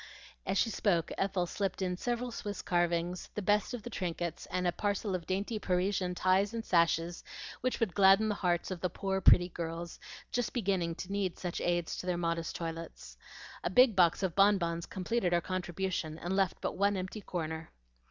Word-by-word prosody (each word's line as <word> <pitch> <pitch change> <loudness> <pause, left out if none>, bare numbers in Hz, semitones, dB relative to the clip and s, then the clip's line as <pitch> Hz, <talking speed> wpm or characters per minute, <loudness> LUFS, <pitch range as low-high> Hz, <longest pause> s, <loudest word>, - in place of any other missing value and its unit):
As 190 - +1
she 225 - +2
spoke 175 -6 +1
Ethel 195 -2 0
slipped 195 +1 -2
in 180 -2 -1
several 240 +5 -2
Swiss 205 -3 -5
carvings, 175 0 0
the 210 - -2
best 205 +5 +2
of 230 - -8
the 240 - -6
trinkets, 175 -3 -3
and 180 0 -1
a 175 - +3
parcel 205 +1 -1
of 175 -2 -3
dainty 200 +4 -1
Parisian 180 -1 0
ties 190 +4 +2
and 225 - -4
sashes 170 0 +2 0.4
which 255 0 -1
would 225 -7 0
gladden 195 +3 +6
the 210 - +1
hearts 175 -2 0
of 180 -2 -4
the 180 - 0
poor, 190 +2 -2
pretty 175 -1 +6
girls, 170 0 -5 0.3
just 245 -2 -1
beginning 190 -7 0
to 185 +2 -7
need 200 -3 -1
such 175 -2 -4
aids 175 -1 0
to 180 - -6
their 180 -1 +1
modest 170 -1 -2
toilets. 165 0 -6 0.5
A - - 0
big 250 -4 +6
box 180 0 +4
of 185 -3 0
bonbons 180 -4 +3
completed 190 -1 -1
her 175 - +4
contribution, 180 -3 -3
and 175 +3 -3
left 195 -2 +1
but - - -1
one 200 +1 +2
empty 185 +3 -5
corner. 160 -3 -4
185 Hz, 190 wpm, -32 LUFS, 175-200 Hz, 0.5 s, gladden